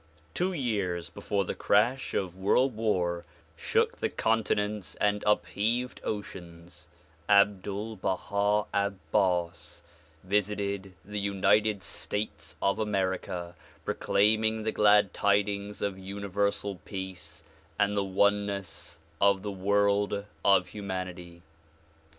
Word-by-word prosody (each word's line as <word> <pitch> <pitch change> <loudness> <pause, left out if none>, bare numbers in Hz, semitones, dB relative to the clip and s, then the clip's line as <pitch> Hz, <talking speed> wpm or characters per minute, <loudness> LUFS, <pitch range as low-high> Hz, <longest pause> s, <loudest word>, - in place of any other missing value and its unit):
Two 180 +2 0
years 100 - -2
before 100 -1 -1
the - - -2
crash 120 +6 +2
of 95 -2 -1
world 115 +7 +2
war 90 -6 0 0.3
shook - - 0
the - - 0
cor 115 0 +2
tinents 105 -2 -2
and 105 0 +1
upheaved 115 +4 +1
oceans 90 -4 -7 0.4
Abdul 100 +2 +2
Baha 100 +2 0
Abbas 95 -3 0 0.4
visited 100 0 -1
the 105 +1 -4
United 100 +1 +2
States 105 +6 -4
of 100 +2 +2
America 95 -4 -1 0.3
proclaiming: 110 +1 +2
the 110 - 0
Glad 105 -2 +4
Tidings 100 0 0
of 100 -2 -2
Universal 100 0 -2
Peace 95 -2 -6 0.3
and 100 0 +2
the 100 - +2
oneness 100 -2 0 0.2
of 100 -1 +4
the 105 - -3
world 100 +1 +1 0.2
of 90 -2 +4
humanity. 90 -4 -6
100 Hz, 105 wpm, -29 LUFS, 95-105 Hz, 0.4 s, Glad